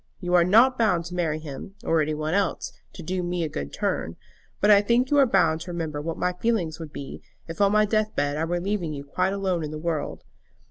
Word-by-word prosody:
You 180 -2 -3
are 175 -1 +6
not 235 +8 +5
bound 180 -7 +2
to 175 - -7
marry 165 -3 0
him, 155 +5 -8
or 165 -1 +2
any 155 0 -1
one 155 +1 -2
else, 200 0 -1 0.2
to 175 - -9
do 180 +3 -2
me 175 -1 -2
a - - 0
good 70 - -5
turn; 80 - -2 0.4
but 205 - +4
I 200 -1 +7
think 235 +5 +1
you 290 - +5
are 275 - +6
bound 165 -6 +2
to 175 +1 -6
remember 160 -4 -3
what 165 +2 -4
my 180 - 0
feelings 180 -5 -1
would 160 -3 -8
be 140 -2 -8 0.3
if 165 +4 -5
on 200 0 +5
my 215 0 +4
death 215 0 0
bed 145 0 0
I 160 +2 -1
were 175 +1 -1
leaving 180 -4 -2
you 140 - -6
quite 180 +7 -1
alone 190 -4 -1
in 150 - -4
the 155 - -6
world. 155 -2 -3
175 Hz, 245 wpm, -25 LUFS, 155-200 Hz, 0.4 s, I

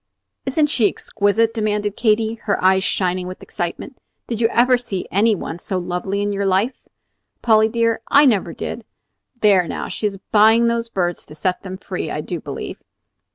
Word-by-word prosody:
"Isn't 295 +3 +2
she 245 -7 +2
exquisite?" 220 +2 0
demanded 210 -2 -1
Katy, 220 -1 +2
her 200 - +1
eyes 190 0 +4
shining 185 -1 0
with 185 - -8
excitement. - - -5 0.3
"Did 230 -1 -4
you 225 - +5
ever 250 +2 +4
see 235 -7 -4
any 215 +3 +3
one 170 -2 -6
so 190 - -3
lovely 180 +3 -2
in 205 0 -1
your 200 0 -1
life, 195 +7 0 0.6
Polly 220 -1 +4
dear? 230 0 0
I 285 +1 +6
never 220 -8 +2
did. - - -6 0.6
There, 195 -5 +4
now! - - -4
she 215 - -1
is 195 -1 -5
buying 220 +2 +5
those 235 0 0
birds 175 -5 -2
to 150 - -12
set 180 +3 -1
them 185 -1 -7
free, - - -5
I - - -3
do - - -5
believe." - - -7
210 Hz, 180 wpm, -20 LUFS, 190-230 Hz, 0.6 s, I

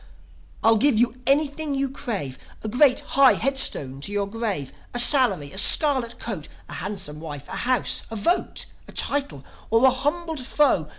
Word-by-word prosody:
"I'll 225 0 +4
give 275 0 +2
you 240 +2 0
anything 290 +1 0
you 275 0 -1
crave: 205 - -5 0.2
A - - -4
great, 255 +4 +3
high 275 -1 +4
headstone 180 - 0
to 200 - -4
your 205 -1 -1
grave, 200 - -5 0.2
A - - +2
salary, 240 - +4
a 190 - 0
scarlet 260 -1 +5
coat, 190 -10 -6 0.2
A - - -10
handsome 190 -6 -4
wife, 145 -3 -9
a - - -13 0.2
house, 255 -2 +1
a 225 - -7
vote, 340 - -1 0.2
A - - -12
title, 275 - 0 0.2
or 225 +3 +3
a 260 - +6
humbled 295 +3 -3
foe." 260 - +1
240 Hz, 170 wpm, -23 LUFS, 195-275 Hz, 0.2 s, a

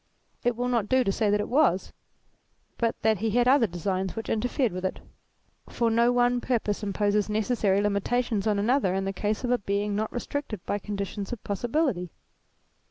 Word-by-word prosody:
It 245 -1 +1
will 245 +2 -1
not 235 -4 0
do 260 0 +4
to 195 - +1
say 210 +1 +1
that 205 +1 +2
it 205 - -2
was, 255 - +2 0.9
but 230 -1 0
that 220 -2 +3
he 225 +2 0
had 240 +3 +2
other 255 -3 +5
designs 185 +1 -2
which 225 - -5
interfered 245 +2 0
with 185 +1 -5
it; 185 - -2 0.7
for 230 -1 0
no 235 +2 +4
one 245 0 +2
purpose 225 -5 -1
imposes 205 0 +1
neces 215 +3 0
sary 200 -2 +2
limitations 205 +1 0
on 210 -1 +2
another 210 -2 +2
in 195 0 -1
the 195 - -2
case 210 +4 -2
of 245 - 0
a 245 - +3
Being 200 +1 -1
not 215 +1 -1
restricted 240 -5 -4
by 205 - -1
conditions 200 -1 -5
of 240 - -6
possibility. 220 - -1
215 Hz, 190 wpm, -27 LUFS, 200-245 Hz, 0.9 s, other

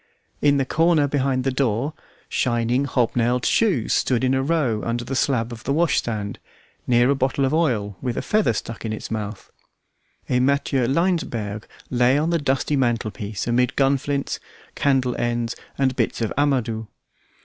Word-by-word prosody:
In 145 -1 +4
the 135 - +1
corner 160 0 +3
behind 135 -2 0
the 135 - +1
door, 130 +2 0 0.3
shining 120 +2 +1
hob 125 -4 0
nailed 120 +1 +1
shoes 180 - +2
stood 125 -1 +1
in 130 0 +2
a 135 - +2
row 135 -7 0
under 120 +1 -2
the 135 - -3
slab 125 -3 +1
of 115 -1 -8
the 140 - -2
washstand, 120 -10 0 0.5
near 120 +2 +4
a - - +2
bottle 135 +1 +1
of 135 - 0
oil 115 - 0
with 125 -2 -2
a - - -2
feather 215 - +2
stuck 115 +1 -5
in 110 -1 -3
its 110 - -6
mouth; 105 -2 -5 0.8
a 125 - +2
Matthieu 135 -1 +1
Laensberg 130 - -1 0.2
lay 125 +2 +3
on 160 +3 +1
the 170 - +2
dusty 140 +1 0
mantelpiece 110 -5 -1
amid 120 +1 +1
gunflints, 140 +1 0 0.3
candle 130 -3 +1
ends, 120 -1 -1 0.2
and 130 -2 +1
bits 115 -4 -1
of 115 -3 -1
amadou. 125 -6 0
130 Hz, 165 wpm, -23 LUFS, 115-140 Hz, 0.8 s, In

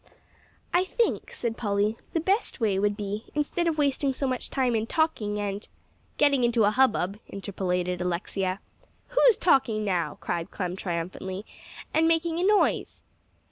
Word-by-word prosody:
"I 355 - +4
think," 460 +5 0
said 230 -2 -3
Polly, 205 0 +1 0.2
"the 330 - +2
best 385 - 0
way 205 -5 +1
would 205 0 +1
be, 205 +1 -4
instead 300 +3 0
of 320 -2 0
wasting 280 -1 +1
so 275 - -2
much 255 -2 -2
time 255 -3 +1
in 220 0 0
talking, 230 -11 0
and 205 0 -3 0.2
" - - -37
"Getting 280 -3 +4
into 235 -1 +3
a 205 - +4
hubbub," 215 -5 +2
interpolated 180 -2 -2
Alexia. 185 +2 -2 0.5
"Who's - - +5
talking 235 -10 +3
now," 180 -4 -1
cried 170 +2 -3
Clem 180 -2 -3
triumphantly, 185 +2 -4 0.5
"and 325 +1 +4
making 330 0 +1
a - - +1
noise?" 410 +1 +2
220 Hz, 155 wpm, -27 LUFS, 195-295 Hz, 0.5 s, Who's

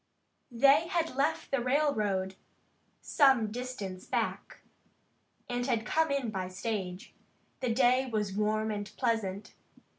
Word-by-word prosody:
They 275 +6 +4
had 335 -3 -1
left 290 +4 0
the 275 -2 +1
railroad 215 -9 +1 0.7
some 265 -7 +3
distance 215 -6 -6
back, - - -3 0.9
and 245 0 -2
had 230 -3 0
come 320 0 +1
in 275 -5 -1
by 190 -3 -3
stage. 190 -1 -5 0.5
The 250 - -1
day 255 +2 +3
was 210 -3 -1
warm 215 +1 0
and 205 -1 -5
pleasant. 215 -5 -1
230 Hz, 120 wpm, -30 LUFS, 205-265 Hz, 0.9 s, They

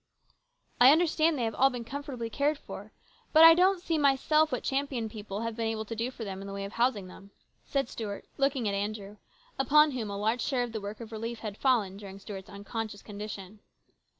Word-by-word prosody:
" - - -23
I 255 +2 +10
understand 320 -1 +3
they 245 - -1
have 225 -1 -1
all 270 +1 +4
been 245 -3 -5
comfortably 270 -3 -5
cared 285 +6 0
for. - - -10 0.4
But 315 +1 +8
I 330 0 +11
don't 370 +2 +3
see, 325 -3 0
myself, 295 +2 +3
what 250 - -2
Champion 270 -4 -1
people 210 -1 -6
have 230 -1 -3
been 225 -1 -1
able 220 -1 -2
to 230 - -6
do 230 +3 -1
for 250 -3 -8
them 195 -2 -6
in 195 - -7
the 195 - -6
way 200 0 -4
of 200 - -8
housing 235 -5 +1
them," 190 +2 -13 0.4
said 275 -4 0
Stuart, 210 -4 -6
looking 275 -4 +1
at 200 - 0
Andrew, 205 0 -4 0.4
upon 300 +3 +5
whom 235 -5 -4
a 200 - -4
large 220 +4 0
share 255 -4 0
of 240 - -5
the 220 -2 -4
work 205 +3 -7
of 230 -1 -9
relief 225 +1 -5
had 210 -3 -5
fallen 215 -7 +1
during 195 -1 -9
Stuart's 195 0 -9
unconscious 205 +1 -6
condition. 210 -1 -8
230 Hz, 220 wpm, -29 LUFS, 205-275 Hz, 0.4 s, I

